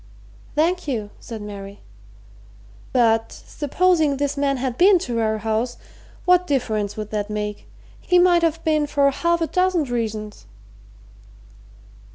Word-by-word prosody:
"Thank 345 +3 +1
you," 215 -7 -3
said 220 -3 -8
Mary. 200 -1 -9 1.1
"But 225 -3 +2
supposing 310 -1 0
this 285 0 -1
man 280 -1 0
had 255 -1 -2
been 375 +6 +6
to 245 -9 -3
our 220 -1 0
house 225 +3 -2 0.5
what 360 0 +4
difference 215 -7 -1
would 215 -1 -5
that 210 -1 -2
make? 210 -1 -4 0.3
He 360 - +2
might 355 -1 +5
have 330 0 0
been 305 -2 +1
for 280 -1 +2
half 340 +4 0
a - - +2
dozen 365 -1 +1
reasons." 215 - -4
270 Hz, 135 wpm, -22 LUFS, 215-330 Hz, 1.1 s, been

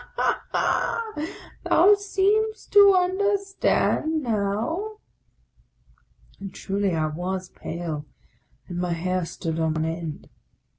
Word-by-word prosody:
ha! 455 -2 0 0.5
thou 385 +5 +6
seem'st 410 +2 0
to 400 -1 +8
understand 375 -4 +1
now! 235 - -1 0.6
" - - -34
And 195 -1 -7
truly 195 -1 -1
I 155 -1 +1
was 180 +4 -3
pale, 160 -3 -5 0.6
and 175 -1 -5
my 180 -1 0
hair 180 +1 -1
stood 165 -1 -4
on 160 -1 0
end. 165 -1 -5
200 Hz, 100 wpm, -25 LUFS, -, 0.6 s, to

